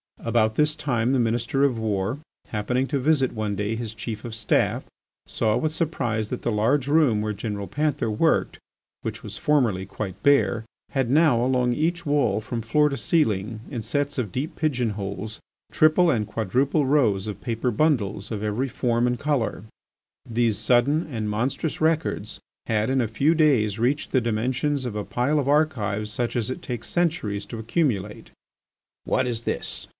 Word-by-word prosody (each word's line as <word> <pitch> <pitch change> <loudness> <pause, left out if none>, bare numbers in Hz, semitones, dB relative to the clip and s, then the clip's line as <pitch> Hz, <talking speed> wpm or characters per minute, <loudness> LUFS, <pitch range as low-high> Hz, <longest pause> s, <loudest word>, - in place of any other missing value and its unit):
About 115 -1 +2
this 150 +4 +2
time 120 -3 0
the 135 - +2
Minister 120 +3 +1
of 135 -4 +2
War 105 +3 -1 0.3
happening 125 +5 0
to 140 -1 -1
visit 135 -2 +2
one 110 -2 -2
day 105 +3 -1
his 115 -1 -5
Chief 110 0 -6
of 120 -3 -6
Staff, 110 -1 +1 0.4
saw 110 -2 +1
with 155 -1 0
surprise 125 -10 -1
that 125 - -5
the 120 - 0
large 125 +6 +1
room 145 -8 +3
where 105 0 -1
General 100 -1 -4
Panther 145 -4 -1
worked, 105 - +1 0.4
which - - -5
was - - -6
formerly 120 -11 +2
quite 95 -1 -6
bare, 140 -5 +3 0.3
had 135 -4 0
now 140 -4 +4
along 125 -1 +2
each 170 +5 -1
wall 140 -9 +2
from 115 +2 -4
floor 150 +7 +3
to 140 - -3
ceiling 110 - 0
in 120 -5 -4
sets 145 +4 -1
of 110 -7 -2
deep 135 - -3
pigeon 125 -7 0
holes, 100 +2 -5 0.3
triple 160 +2 +4
and 110 -6 0
quadruple 130 - +1
rows 120 -9 +2
of 105 - -6
paper 120 0 -1
bundles 105 -6 0
of 105 -2 -3
every 110 +6 -1
as - - -10
form 120 -1 +1
and 125 0 -1
colour. 140 -9 -1 0.7
These 115 -2 +1
sudden 135 - +2
and 110 -3 -2
monstrous 130 +10 -2
records 160 -9 0 0.3
had 110 +2 +1
in 135 -1 +2
a 115 - 0
few 135 +9 +2
days 125 -10 +3
reached 135 +5 0
the 130 - +3
dimensions 125 +5 -1
of 120 -4 -4
a 105 - -3
pile 140 +5 +1
of 140 - -1
archives 110 -9 +1
such 120 +2 -2
as 120 0 0
it - - -5
takes 120 -2 -5
centuries 155 - -1
to 115 - -6
accumulate. 110 - -1 0.8
"What 130 - +1
is 115 -2 -3
this?" - - -3
120 Hz, 175 wpm, -24 LUFS, 110-145 Hz, 0.8 s, now